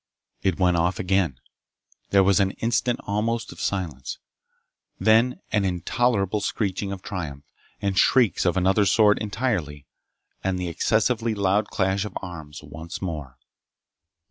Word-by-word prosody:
It 95 -3 +1
went 90 -2 +3
off 85 +3 +1
again. 90 -8 0 0.7
There 100 -1 +5
was 100 +1 +4
an 95 -1 +2
instant 120 +1 0
almost 115 +3 -1
of - - -10
silence. 80 -10 -3 0.8
Then 115 +3 +3
an 105 - +2
intolerable 100 +3 0
screeching 100 -1 -2
of 95 -1 -6
triumph, 75 -8 -5 0.4
and 100 -1 0
shrieks 120 +3 +4
of 90 0 +1
another 95 +2 +3
sort 105 0 +4
entirely, 100 - -2 0.6
and 95 -1 0
the 90 -1 -3
excessively 110 +5 +1
loud 100 +1 +1
clash 95 0 0
of 105 -3 -5
arms 80 -5 -9
once 80 +3 -8
more. 75 -9 -5
95 Hz, 135 wpm, -24 LUFS, 85-105 Hz, 0.8 s, There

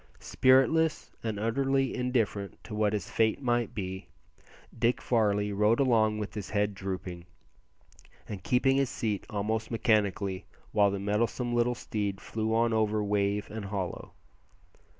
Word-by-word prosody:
Spiritless, 150 +5 +3
and 110 -3 -2
utterly 135 +4 +1
indifferent 115 -6 -1
to 110 - -9
what 105 0 +1
his 100 -3 -2
fate 110 -1 +2
might 120 -3 0
be, 95 -2 -5 0.7
Dick 120 +2 +2
Varley 105 -3 +1
rode 105 +3 +3
along 110 -5 +3
with 105 -1 -5
his 105 -4 -6
head 105 -1 0
drooping, 90 -2 -6 1.0
and 100 -3 -6
keeping 135 +2 +2
his 135 -2 +2
seat 110 -6 -3
almost 110 +2 -2
mechanically, 100 -4 0 0.3
while 105 -2 +4
the 100 - -2
mettlesome 115 +4 -1
little 120 +1 +2
steed 100 -4 -3
flew 110 0 -3
on 115 +1 +2
over 110 -1 +1
wave 100 0 0
and 110 -2 -5
hollow. 95 -3 -4
110 Hz, 140 wpm, -29 LUFS, 100-120 Hz, 1.0 s, while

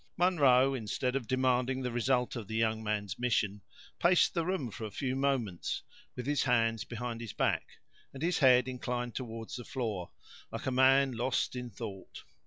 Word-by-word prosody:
Munro, 135 -7 +4
instead 125 +1 -2
of 130 -4 -2
demanding 130 +1 +1
the 125 - -2
result 125 +1 +1
of 115 -5 -5
the 110 - -5
young 110 0 +1
man's 105 -3 -2
mission, 105 -4 0 0.4
paced 175 +1 +4
the 170 - 0
room 160 - -2
for 110 - -8
a - - -4
few 130 +5 -2
moments, 130 -10 -1 0.3
with 125 - -5
his 145 +1 +1
hands 115 -3 +2
behind 120 -1 -5
his 115 -4 -6
back, - - -1 0.3
and 135 +2 -7
his 175 +1 +1
head 125 -3 +6
inclined 125 -1 -3
toward 115 -3 -6
the 120 - -6
floor, 110 -9 -3 0.4
like - - -5
a 130 - 0
man 135 +1 +5
lost 125 +2 -1
in 125 -1 -5
thought. 95 -2 -8
125 Hz, 180 wpm, -31 LUFS, 115-130 Hz, 0.4 s, head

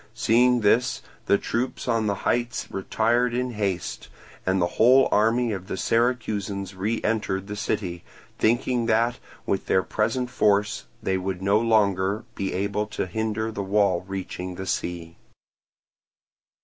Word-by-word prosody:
Seeing 120 +2 +3
this, 115 +4 +2 0.2
the 100 - +5
troops 125 +5 -3
on 115 -3 +1
the 100 - +1
heights 120 0 -1
retired 120 +5 +1
in 125 0 -1
haste, 100 -5 -3 0.4
and 95 +1 +2
the 85 - +3 0.2
whole 130 +3 +7
army 115 +3 +3
of 95 -2 -5
the - - -4
Syracusans 105 -5 0
re 105 +5 -1
entered 105 -3 -1
the 105 +1 -6
city, 90 -4 -3 0.4
thinking 120 +1 +1
that 115 +2 +2 0.3
with 95 - -1
their 95 - +3
present 120 +3 -1
force 105 -3 +1 0.2
they 95 -2 0
would 95 0 -4
no 100 +2 +4
longer 105 -2 +2
be 95 - -3
able 100 +2 -1
to 105 - -3
hinder 110 +3 -2
the 105 - -4
wall 100 -2 +2
reaching 95 -1 -5
the 95 - -6
sea. 85 -3 -3
105 Hz, 145 wpm, -25 LUFS, 95-115 Hz, 0.4 s, whole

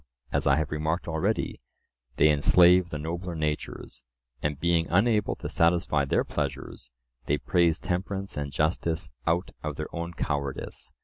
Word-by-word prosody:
As - - 0
I 70 - +5
have 80 0 -1
remarked 80 +4 -1
already, 85 +7 -1 0.5
they 75 - +5
enslave 90 +4 +5
the 75 - -4
nobler 85 +3 -4
natures, 75 -5 -4 0.4
and 75 -1 -2
being 85 -1 +2
unable 105 +3 +2
to - - -6
satisfy 85 -4 +2
their 70 - +1
pleasures, 65 -4 -4 0.4
they 75 - +2
praise 85 0 +2
temperance 95 +2 -3
and 70 -1 -3
justice 80 0 -1 0.2
out 85 +3 +1
of 75 -2 -4
their 75 +3 -6
own 85 +1 -4
cowardice. 70 -3 -4
80 Hz, 145 wpm, -27 LUFS, 75-90 Hz, 0.5 s, I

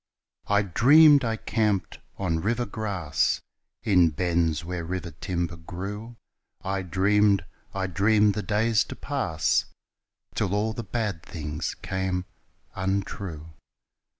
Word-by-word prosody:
I 100 0 +3
dreamed 140 - +6
I 115 -1 0
camped 105 -6 -1 0.2
on 80 0 -1
river 115 +7 0
grass 100 -7 -1 0.4
In 90 -5 +5
bends 85 0 0
where 85 -1 -4
river 85 0 -4
timber 85 +1 -3
grew, 100 +7 -7 0.5
I 95 0 -1
dreamed, 100 +2 +2 0.3
I 95 -1 -1
dreamed 105 +3 +3
the 105 - -2
days 110 +1 +2
to - - -8
pass 95 - 0 0.7
Till 95 - 0
all 110 +2 0
the 115 - -4
bad 105 -9 -3
things 75 -3 -5
came 95 -1 -2 0.5
untrue. 95 -4 -3
95 Hz, 120 wpm, -26 LUFS, 85-105 Hz, 0.7 s, dreamed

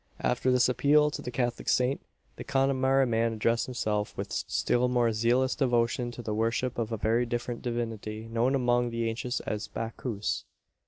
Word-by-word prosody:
After 125 +1 +1
this 125 -1 +4
appeal 145 +4 +4
to - - -5
the - - -5
Catholic 120 -2 -2
saint, 125 +5 +2 0.3
the - - -7
Connemara 135 0 +2
man 115 -1 +1
addressed 115 +1 +1
himself 105 -5 -2
with - - -4
still 120 +1 +1
more 120 -2 +2
zealous 120 +4 +2
devotion 120 -2 +1
to 120 0 -8
the 110 - -2
worship 115 +3 0
of 115 -1 -2
a 115 - -1
very 115 +3 +1
different 120 0 -3
divinity, 115 -2 -4
known 115 +4 +1
among 120 -2 +2
the 115 0 -1
ancients 120 +2 -2
as 105 0 -4
Bacchus. 115 -2 -3
120 Hz, 170 wpm, -29 LUFS, 115-125 Hz, 0.3 s, this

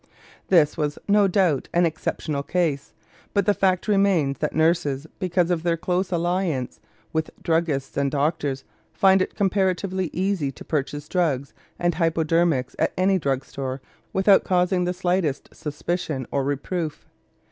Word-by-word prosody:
This 160 -5 +4
was, 150 -2 -1
no 205 0 +5
doubt, 180 -7 +1
an 175 0 +5
exceptional 155 -2 -2
case, 155 -3 -1 0.4
but 200 - +3
the 205 - +4
fact 185 -1 +1
remains 195 -9 +2
that 150 - -2
nurses, 160 -3 +1
because 180 -2 +1
of 170 -2 +1
their 170 0 0
close 180 +2 -1
alliance 175 -6 -1 0.3
with 160 0 -1
druggists 160 -5 0
and 140 -1 +2
doctors, 145 -1 -1 0.3
find 190 -2 +4
it - - -2
comparatively 190 -2 0
easy 185 -6 -1
to - - -12
purchase 145 0 -2
drugs 150 -7 0 0.2
and 175 0 +1
hypodermics 165 -4 +1
at - - +1
any 190 +1 +3
drug 135 -3 -1
store 135 -1 -5 0.3
without 195 +1 +4
causing 180 0 +1
the 180 - 0
slightest 175 -5 -1
suspicion 150 -2 -3
or 140 - 0
reproof. 145 +3 -3
170 Hz, 145 wpm, -24 LUFS, 145-185 Hz, 0.4 s, no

